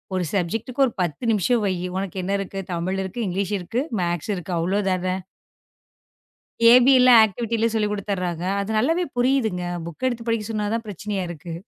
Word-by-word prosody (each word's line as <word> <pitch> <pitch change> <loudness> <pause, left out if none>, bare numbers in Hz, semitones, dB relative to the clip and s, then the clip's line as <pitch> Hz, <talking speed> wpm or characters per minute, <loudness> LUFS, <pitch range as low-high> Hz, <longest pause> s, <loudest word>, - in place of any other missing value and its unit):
ஒரு 185 - 0
சப்ஜெக்க்ட்டுக்கு 225 +8 0
ஒரு 240 - -3
10 175 +5 -2
நிமிஷம் 220 +3 +2
வை. 190 - 0 0.2
உனக்கு 195 -1 -4
என்ன 195 - -2
இருக்கு? 195 0 -5
தமிழ் 185 +3 -2
இருக்கு, 190 +5 -6
இங்கிலீஷ் 195 +2 -2
இருக்கு, 225 +9 -2 0.2
மேக்ஸ் 175 +3 -2
இருக்கு. 180 0 -7
அவ்வளவுதான. 185 +1 0 1.6
ஏ.வி 250 +3 +7
எல்லாம் 250 -2 +8
ஆக்ட்டிவிட்டில 230 +2 0
சொல்லிக் 210 -2 0
கொடுத்துடுறாங்க. 185 -4 -3 0.2
அது 200 - -5
நல்லவே 330 +10 +1
புரியுதுங்க. 245 -8 +1 0.2
புக் 170 +9 -5
எடுத்துப் 240 -2 -4
படிக்கச் 225 -1 -1
சொன்னாதான் 215 +2 -2
பிரச்சனையா 200 0 -4
இருக்கு. 170 0 -7
205 Hz, 155 wpm, -23 LUFS, 180-230 Hz, 1.6 s, எல்லாம்